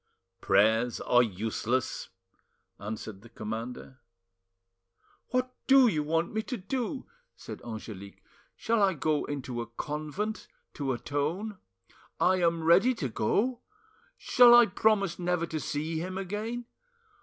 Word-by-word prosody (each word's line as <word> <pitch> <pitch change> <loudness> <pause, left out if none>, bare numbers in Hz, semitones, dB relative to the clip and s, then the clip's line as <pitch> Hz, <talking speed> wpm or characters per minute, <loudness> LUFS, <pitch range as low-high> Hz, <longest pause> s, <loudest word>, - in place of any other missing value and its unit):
"Prayers 110 +4 +3
are 120 - +4
useless!" 115 +4 -2 0.7
answered 105 -1 -6
the 115 - -15
commander. 115 +4 -6 1.3
"What 255 0 -1
do 270 -2 +7
you 160 -9 +1
want 165 +4 -1
me 220 - 0
to 250 +3 -5
do?" 250 +6 -3 0.3
said - - -9
Angelique. 105 -3 -9 0.3
"Shall 230 -1 0
I 195 -3 +3
go 150 0 0
into 130 -4 -4
a 115 - -6
convent 155 - -4 0.3
to 140 -3 -2
atone? 160 - -3 0.6
I 185 +1 +4
am 170 -2 +1
ready 190 +10 +5
to 140 - -3
go. 225 - 0 0.6
Shall 240 -1 +7
I 240 0 +8
promise 200 -6 +1
never 180 -1 0
to 160 -2 -4
see 155 +2 -3
him 185 +3 -4
again? 215 +5 -4
165 Hz, 125 wpm, -29 LUFS, -, 1.3 s, I